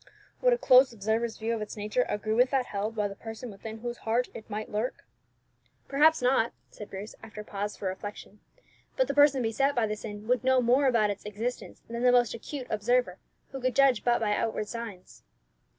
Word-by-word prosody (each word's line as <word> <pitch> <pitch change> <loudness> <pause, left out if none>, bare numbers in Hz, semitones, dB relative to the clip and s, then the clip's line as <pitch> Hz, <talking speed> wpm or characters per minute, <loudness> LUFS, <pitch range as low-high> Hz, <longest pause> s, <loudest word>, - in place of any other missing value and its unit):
"Would - - +4
a 485 - +3
close 260 - +6
observer's 225 +1 -1
view 225 +1 -2
of 225 - -3
its 210 +1 -6
nature 210 +4 0
agree 210 +1 -1
with 250 +3 +4
that 265 -2 +1
held 210 +2 -3
by 210 -1 0
the 200 - -7
person 225 +2 -8
within 220 +2 -9
whose 240 0 -4
heart 235 +3 0
it 220 - -10
might 215 +1 -4
lurk?" 215 +4 -3 0.8
"Perhaps 300 +1 +4
not," 245 -2 +2 0.2
said 210 - -10
Bruce, 200 +3 -7
after 215 -1 -9
a - - -13
pause 205 +1 -4
for 190 - -2
reflection. 205 +2 -8 0.6
"But - - +3
the - - -1
person 285 -2 +5
beset 270 +5 +1
by 235 -2 +2
the 215 0 -2
sin 210 -1 -8
would 250 0 +2
know 260 0 +4
more 250 +3 +3
about 220 -5 +3
its 200 - -7
existence 220 +4 -5
than 235 +1 -5
the 250 0 +5
most 245 -2 +3
acute 255 +3 -6
observer, 215 -2 +1 0.3
who 270 - -6
could 255 -1 0
judge 270 -4 +4
but 240 -1 +3
by 210 -2 +1
outward 220 -1 -2
signs." 225 -6 -8
230 Hz, 210 wpm, -28 LUFS, 210-250 Hz, 0.8 s, close